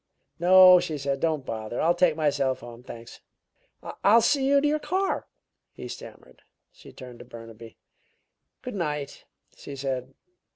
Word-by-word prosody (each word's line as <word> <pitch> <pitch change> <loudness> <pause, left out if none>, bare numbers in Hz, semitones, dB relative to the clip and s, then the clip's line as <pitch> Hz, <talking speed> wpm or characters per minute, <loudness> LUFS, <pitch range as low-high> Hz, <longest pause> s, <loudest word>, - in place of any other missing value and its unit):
"No," 185 +1 +7
she 165 -4 -4
said. 140 0 -3
"Don't 155 -4 -1
bother. 110 +1 -5
I'll 170 +2 +3
take 175 -2 +2
myself 140 -4 0
home, 120 0 -11
thanks." 115 -2 -12 0.8
"I'll 220 +4 +6
see 275 -2 +2
you 280 0 +4
to 295 - +1
your 305 +1 0
car," 375 +6 -2 0.5
he - - -9
stammered. - - -12 0.3
She - - -16
turned 125 -2 -12
to - - -11
Burnaby. 115 -1 -12 0.9
"Good 250 - -6
night!" 150 -7 -4 0.3
she 140 - -10
said. 130 -1 -5
150 Hz, 150 wpm, -25 LUFS, 125-185 Hz, 0.9 s, No